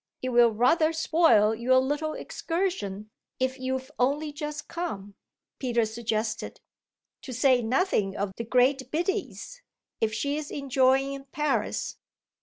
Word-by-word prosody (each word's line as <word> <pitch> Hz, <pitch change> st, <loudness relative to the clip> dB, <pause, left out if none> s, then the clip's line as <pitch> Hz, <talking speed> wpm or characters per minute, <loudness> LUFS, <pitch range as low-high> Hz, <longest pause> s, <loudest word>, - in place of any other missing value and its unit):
"It 255 Hz, -, -1 dB
will 240 Hz, -1 st, +6 dB
rather 255 Hz, +9 st, +3 dB
spoil 320 Hz, -10 st, +4 dB
your 245 Hz, +3 st, +2 dB
little 295 Hz, +4 st, 0 dB
excursion, 270 Hz, -, -3 dB, 0.3 s
if 260 Hz, +1 st, -1 dB
you've 260 Hz, +1 st, -3 dB
only 290 Hz, +4 st, +1 dB
just 295 Hz, 0 st, -5 dB
come," 205 Hz, -, -5 dB, 0.5 s
Peter 240 Hz, -3 st, +1 dB
suggested; 220 Hz, 0 st, -3 dB, 0.6 s
"to 260 Hz, -, -8 dB
say 255 Hz, 0 st, +3 dB
nothing 225 Hz, -, 0 dB
of 200 Hz, 0 st, -2 dB
the 230 Hz, -, -4 dB
great 255 Hz, +3 st, +2 dB
Biddy's, 385 Hz, -, -3 dB, 0.4 s
if 220 Hz, -1 st, +1 dB
she's 285 Hz, +6 st, -2 dB
enjoying 270 Hz, 0 st, +1 dB
Paris." 300 Hz, +2 st, -2 dB
260 Hz, 120 wpm, -27 LUFS, 230-295 Hz, 0.6 s, will